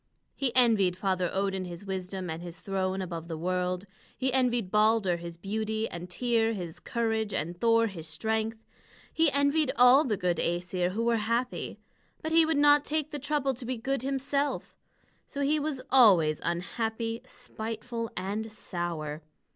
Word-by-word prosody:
He 270 -3 0
envied 215 -8 +4
Father 185 -2 0
Odin 195 -1 -1
his 175 +2 -8
wisdom 190 -1 -4
and 160 0 -5
his 175 -1 -8
throne 190 -1 -2
above 170 -2 -6
the 165 -2 -5
world. 180 +2 -1 0.3
He 260 -1 0
envied 245 -7 +1
Balder 210 -4 +3
his 170 0 -8
beauty, 220 +4 -2
and 175 +1 -7
Tŷr 230 +2 +1
his 175 -4 -6
courage, 225 -3 -1
and 170 +4 -2
Thor 230 0 +4
his 175 -7 -6
strength. 220 +5 -2 0.5
He 325 -1 +4
envied 285 +1 +2
all 250 +3 +7
the 220 -7 -1
good 180 -2 0
Æsir 180 +2 -1
who 225 +3 -1
were 235 0 +2
happy; 230 +3 -2 0.5
but 315 - -2
he 325 0 +6
would 320 -2 +1
not 290 0 +6
take 305 0 -2
the 295 - -4
trouble 285 -1 0
to 255 +1 -8
be 250 +1 -3
good 270 +3 -2
himself. 275 +2 -2 0.5
So 285 - -5
he 295 +2 +2
was 290 -3 -3
always 185 - +6
unhappy, 225 +6 -2
spiteful, 230 +1 -6
and 205 +4 -3
sour. 170 -7 -4
220 Hz, 165 wpm, -29 LUFS, 180-255 Hz, 0.5 s, all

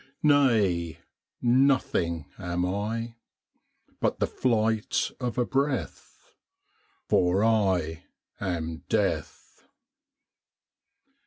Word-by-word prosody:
Nay; 110 - +3 0.5
nothing 120 - +2
am 90 -1 -1
I, 115 +5 -3 0.8
But - - 0
the - - +2
flight 110 -3 0
of 125 -2 -3
a 125 - +2
breath 135 +1 -3 0.7
For 90 +3 +3
I 95 -8 +1 0.3
am 85 -4 -3
Death! - - -2
105 Hz, 75 wpm, -27 LUFS, 90-120 Hz, 0.8 s, Nay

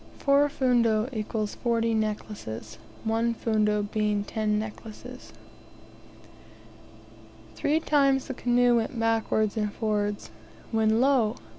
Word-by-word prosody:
4 280 +1 +3
fundo 240 -5 +2
== 215 -2 -2 0.4
40 230 -1 +1
necklaces; 210 - -4 0.2
1 230 +1 0
fundo 210 -2 +1
being 210 0 -1
10 210 0 -1
necklaces. 220 +3 -8 2.2
Three 305 +2 +1
times 275 -4 +2
the 265 - -5
canoes 245 -1 +3
went 230 +2 -2
backwards 225 -1 +1
and 210 -1 -1
forwards, 205 - -2 0.4
when, 220 0 +2
lo! 255 -5 +3
225 Hz, 105 wpm, -27 LUFS, 210-245 Hz, 2.2 s, 4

